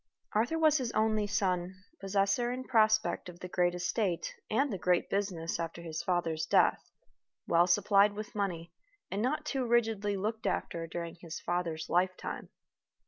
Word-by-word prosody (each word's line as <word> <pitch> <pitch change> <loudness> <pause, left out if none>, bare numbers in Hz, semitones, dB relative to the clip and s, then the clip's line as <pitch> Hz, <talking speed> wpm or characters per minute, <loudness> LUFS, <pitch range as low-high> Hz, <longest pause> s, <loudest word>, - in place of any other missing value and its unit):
Arthur 235 +10 +1
was 310 -2 +4
his 245 -3 -2
only 215 -1 +2
son, 185 -3 0 0.2
possessor 200 +5 +1
in 255 +1 -4
prospect 215 -6 +2
of 175 0 -12
the 180 - -6
great 180 -1 +1
estate 180 0 -1 0.2
and 265 +3 +1
the - - -2
great 180 -2 +1
business 185 -5 -1
after 170 0 -4
his 160 -1 -4
father's 170 -2 -1
death; - - +3 0.6
well 170 +1 +4
supplied 200 +2 +4
with 210 +1 -7
money, 175 -5 -3 0.4
and 200 - -1
not 295 +6 0
too 270 -3 -1
rigidly 220 -4 +1
looked 220 +3 -2
after 165 -1 -2
during 170 0 -5
his 165 -2 -6
father's 170 -2 -2
lifetime. 185 +1 -1
195 Hz, 155 wpm, -31 LUFS, 175-220 Hz, 0.6 s, was